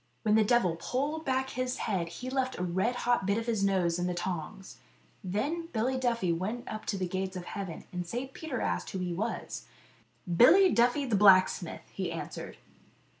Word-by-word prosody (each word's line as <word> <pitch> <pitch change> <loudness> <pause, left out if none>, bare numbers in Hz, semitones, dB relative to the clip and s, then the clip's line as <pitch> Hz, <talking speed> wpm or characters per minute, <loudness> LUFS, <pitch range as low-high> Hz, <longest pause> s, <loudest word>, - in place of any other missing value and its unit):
When 210 - +3
the 220 0 +5
devil 205 -7 +2
pulled 295 - -2
back 265 0 0
his 255 0 -2
head 180 -5 -1
he 250 +9 -6
left 260 -1 -1
a 180 - -2
red 190 +7 0
hot 240 -5 +2
bit 200 +1 +2
of 230 - -2
his 225 -4 0
nose 180 -3 +2
in 175 - 0
the 180 - -2
tongs. 185 +2 -5 0.5
Then 285 - -2
Billy 245 +3 0
Duffy 235 -9 +1
went 210 +8 -3
up 215 - -6
to 200 - -1
the 185 -1 -1
gates 190 +1 -3
of 175 - -7
heaven, 195 -5 -6
and 180 -1 -3
St. 255 +7 -4
Peter 300 -7 -4
asked 90 0 -1
him 185 - -2
who - - -1
he 175 - -2
was. 215 +7 -4 0.3
" 175 -3 -8
Billy 370 +9 +7
Duffy 245 +4 +3
the 235 -5 +1
blacksmith," 190 -3 +4
he 185 -3 -3
answered. 165 - -6
210 Hz, 200 wpm, -30 LUFS, 180-250 Hz, 0.5 s, Billy